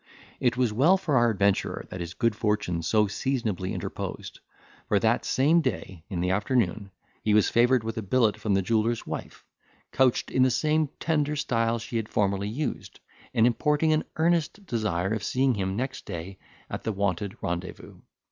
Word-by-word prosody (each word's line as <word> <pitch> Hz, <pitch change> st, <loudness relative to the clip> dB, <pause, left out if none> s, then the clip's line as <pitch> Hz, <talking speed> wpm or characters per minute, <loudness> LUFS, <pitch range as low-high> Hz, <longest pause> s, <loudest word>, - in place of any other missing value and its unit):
It 120 Hz, -1 st, +1 dB
was 125 Hz, -4 st, +1 dB
well 155 Hz, -, +5 dB
for 165 Hz, -7 st, -1 dB
our 120 Hz, -2 st, +4 dB
adventurer 100 Hz, -2 st, 0 dB
that 95 Hz, -, -6 dB
his 85 Hz, 0 st, -6 dB
good 115 Hz, -3 st, +1 dB
fortune 105 Hz, -6 st, -1 dB
so 105 Hz, +6 st, +2 dB
seasonably 105 Hz, -4 st, -2 dB
interposed; -, -, -5 dB, 0.5 s
for 105 Hz, -, +3 dB
that 110 Hz, +3 st, +2 dB
same 155 Hz, +6 st, +3 dB
day, 95 Hz, -, -4 dB
in 90 Hz, -4 st, -3 dB
the 90 Hz, +1 st, +1 dB
afternoon, 105 Hz, -1 st, 0 dB, 0.3 s
he 105 Hz, -1 st, +2 dB
was 105 Hz, -, +4 dB
favoured 120 Hz, 0 st, +4 dB
with 115 Hz, 0 st, -3 dB
a -, -, -3 dB
billet 110 Hz, +1 st, +2 dB
from 105 Hz, -3 st, -1 dB
the 95 Hz, -, +1 dB
jeweller's 115 Hz, +3 st, 0 dB
wife, -, -, -7 dB, 0.5 s
couched 130 Hz, -2 st, +2 dB
in 130 Hz, -, +2 dB
the 130 Hz, -, +5 dB
same 155 Hz, +4 st, +1 dB
tender 150 Hz, -2 st, 0 dB
style 115 Hz, -5 st, 0 dB
she 115 Hz, +1 st, -4 dB
had 110 Hz, -1 st, -3 dB
formerly 100 Hz, 0 st, 0 dB
used, 135 Hz, +5 st, -4 dB, 0.4 s
and 115 Hz, -, +5 dB
importing 150 Hz, +6 st, +2 dB
an 155 Hz, -, +1 dB
earnest 170 Hz, +4 st, 0 dB
desire 105 Hz, -, -1 dB
of 110 Hz, -2 st, -3 dB
seeing 130 Hz, +4 st, +2 dB
him 95 Hz, -3 st, -2 dB
next 130 Hz, +4 st, -4 dB
day 90 Hz, +3 st, -6 dB, 0.3 s
at -, -, -5 dB
the 110 Hz, -, -1 dB
wonted 100 Hz, -1 st, -2 dB
rendezvous. 85 Hz, +1 st, -5 dB
115 Hz, 175 wpm, -27 LUFS, 100-130 Hz, 0.5 s, well